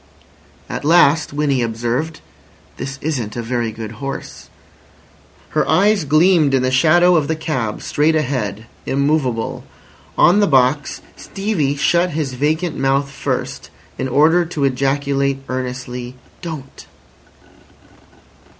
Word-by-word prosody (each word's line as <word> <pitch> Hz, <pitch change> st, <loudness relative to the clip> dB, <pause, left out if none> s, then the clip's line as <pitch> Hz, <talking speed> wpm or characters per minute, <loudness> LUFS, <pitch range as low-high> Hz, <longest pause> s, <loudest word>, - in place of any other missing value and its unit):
At -, -, -5 dB
last 160 Hz, -1 st, +4 dB
Winnie 145 Hz, -3 st, 0 dB
observed: 120 Hz, +7 st, -2 dB, 0.6 s
"This 135 Hz, +1 st, -5 dB
isn't 125 Hz, -9 st, -3 dB
a 120 Hz, -, -3 dB
very 120 Hz, -1 st, -2 dB
good 110 Hz, -1 st, -7 dB
horse." 135 Hz, 0 st, -6 dB, 1.0 s
Her -, -, 0 dB
eyes 200 Hz, -2 st, +3 dB
gleamed 155 Hz, -1 st, +4 dB
in 130 Hz, -, +1 dB
the 130 Hz, -, +1 dB
shadow 175 Hz, +7 st, +4 dB
of 155 Hz, -4 st, +2 dB
the 160 Hz, -, 0 dB
cab 130 Hz, -9 st, -3 dB
straight 155 Hz, +2 st, +1 dB
ahead, 120 Hz, -8 st, -2 dB, 0.2 s
immovable. 135 Hz, -5 st, 0 dB, 0.5 s
On 190 Hz, +4 st, +5 dB
the 205 Hz, -, +3 dB
box, 135 Hz, 0 st, +2 dB
Stevie 195 Hz, -9 st, -2 dB
shut 170 Hz, +4 st, +1 dB
his 145 Hz, -5 st, -2 dB
vacant 155 Hz, +5 st, -1 dB
mouth 135 Hz, +1 st, 0 dB
first, -, -, -4 dB, 0.3 s
in 130 Hz, -, -1 dB
order 155 Hz, +7 st, +4 dB
to 160 Hz, -4 st, -4 dB
ejaculate 140 Hz, +1 st, 0 dB
earnestly: 125 Hz, -1 st, -5 dB, 0.3 s
"Don't." 155 Hz, -6 st, -8 dB
140 Hz, 120 wpm, -18 LUFS, 130-160 Hz, 1.0 s, On